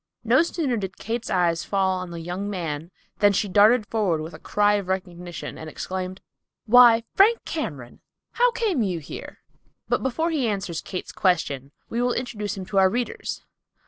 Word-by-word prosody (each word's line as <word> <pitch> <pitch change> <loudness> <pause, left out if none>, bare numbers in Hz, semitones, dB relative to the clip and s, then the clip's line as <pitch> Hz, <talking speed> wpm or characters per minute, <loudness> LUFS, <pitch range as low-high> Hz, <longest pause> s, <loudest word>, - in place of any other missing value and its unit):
No 240 +6 +5
sooner 315 -7 -1
did 195 -2 -5
Kate's 230 +2 -4
eyes 170 -2 +1
fall 190 -2 +1
on 185 -1 -6
the 170 -1 -6
young 180 +4 -4
man 165 -5 -4 0.3
than 205 0 +5
she 205 - +1
darted 210 +4 +5
forward 205 -8 0
with 160 +2 -7
a - - -10
cry 205 0 +2
of 200 -3 -1
recognition 180 -2 -5
and 160 - -7
exclaimed, 185 +3 -5 0.4
"Why, 235 0 +7
Frank 445 +4 +4
Cameron, 150 - -5 0.3
how - - +3
came 425 - 0
you 190 -5 0
here?" 155 - -9 0.4
But - - +1
before 320 +6 0
he 280 -7 0
answers 190 -6 -2
Kate's 185 - -6
question, 145 -7 0 0.2
we 235 - -2
will 245 0 +2
introduce 210 -5 -3
him 190 - -5
to 195 +1 +1
our 190 0 +6
readers. 240 +4 -3
200 Hz, 175 wpm, -24 LUFS, 180-240 Hz, 0.4 s, Why